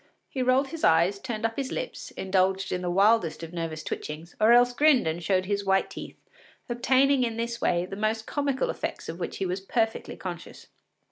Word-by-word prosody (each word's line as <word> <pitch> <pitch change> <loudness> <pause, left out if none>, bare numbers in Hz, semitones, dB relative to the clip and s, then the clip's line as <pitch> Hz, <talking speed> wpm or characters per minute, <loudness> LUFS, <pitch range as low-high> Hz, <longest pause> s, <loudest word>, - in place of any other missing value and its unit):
He 260 - -3
rolled 255 +2 +2
his 325 +2 -7
eyes, 170 +5 +4
turned 225 -1 -4
up 225 0 -2
his 270 -2 -3
lips, - - -5
indulged 190 0 +1
in 180 - -1
the 180 - -2
wildest 195 -2 +3
of 165 +1 -8
nervous 165 -2 -4
twitchings, 155 +3 -6
or 220 +2 +6
else 245 +1 +6
grinned 285 - +4
and 160 +2 -2
showed 185 +2 +1
his 200 +1 -1
white 195 0 +1
teeth, - - -8 0.5
obtaining 260 +2 +3
in 230 -2 -2
this 235 0 -3
way 175 0 +1
most 215 +2 -1
comical 285 - -1
effects - - -5
of 165 +2 -6
which 170 - -4
he 195 - -2
was 185 +1 -2
perfectly 225 +3 -1
conscious. 175 -3 -8
210 Hz, 195 wpm, -27 LUFS, 180-245 Hz, 0.5 s, or